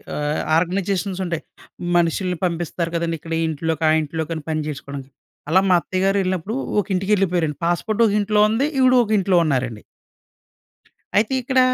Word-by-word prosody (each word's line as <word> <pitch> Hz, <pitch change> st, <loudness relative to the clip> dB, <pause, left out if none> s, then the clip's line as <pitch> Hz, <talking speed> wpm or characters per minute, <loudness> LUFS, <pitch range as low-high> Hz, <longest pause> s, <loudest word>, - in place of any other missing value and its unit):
ఆహ్, 150 Hz, +1 st, -1 dB, 0.2 s
ఆర్గనైజేషన్స్ 190 Hz, +2 st, -1 dB
ఉంటాయి. 170 Hz, -2 st, -3 dB, 0.5 s
మనుషుల్ని 175 Hz, +1 st, 0 dB
పంపిస్తారు 170 Hz, 0 st, -2 dB
కదండీ. 165 Hz, 0 st, -1 dB
ఇక్కడ 165 Hz, +1 st, -7 dB
ఈ -, -, +1 dB
ఇంట్లోకి, 160 Hz, +1 st, -2 dB
ఆ -, -, +5 dB
ఇంట్లోకి 160 Hz, +1 st, -4 dB
అని 155 Hz, -, -6 dB
పని 155 Hz, -1 st, -1 dB
చేసుకోవడానికి 140 Hz, -2 st, -7 dB, 0.4 s
అలా 185 Hz, +4 st, +5 dB
మా -, -, +5 dB
అత్తయ్య 185 Hz, +2 st, -3 dB
గారు 195 Hz, +1 st, +2 dB
ఎళ్ళినప్పుడు 185 Hz, +2 st, -2 dB, 0.3 s
ఒక 205 Hz, -, 0 dB
ఇంటికి 190 Hz, +3 st, -1 dB
ఎళ్ళిపోయారండి. 175 Hz, -6 st, 0 dB
పాస్‌పోర్ట్ 200 Hz, +6 st, -1 dB
ఒక 210 Hz, -, +1 dB
ఇంట్లో 210 Hz, +1 st, +1 dB
ఉంది. 225 Hz, +6 st, +1 dB
ఈవిడ 255 Hz, -1 st, +5 dB
ఒక 220 Hz, -, -5 dB
ఇంట్లో 190 Hz, -2 st, +2 dB
ఉన్నారండి. 125 Hz, -7 st, -1 dB, 1.4 s
అయితే 215 Hz, +5 st, +2 dB
ఇక్కడ, 260 Hz, +1 st, +1 dB
175 Hz, 165 wpm, -21 LUFS, 160-195 Hz, 1.4 s, ఆ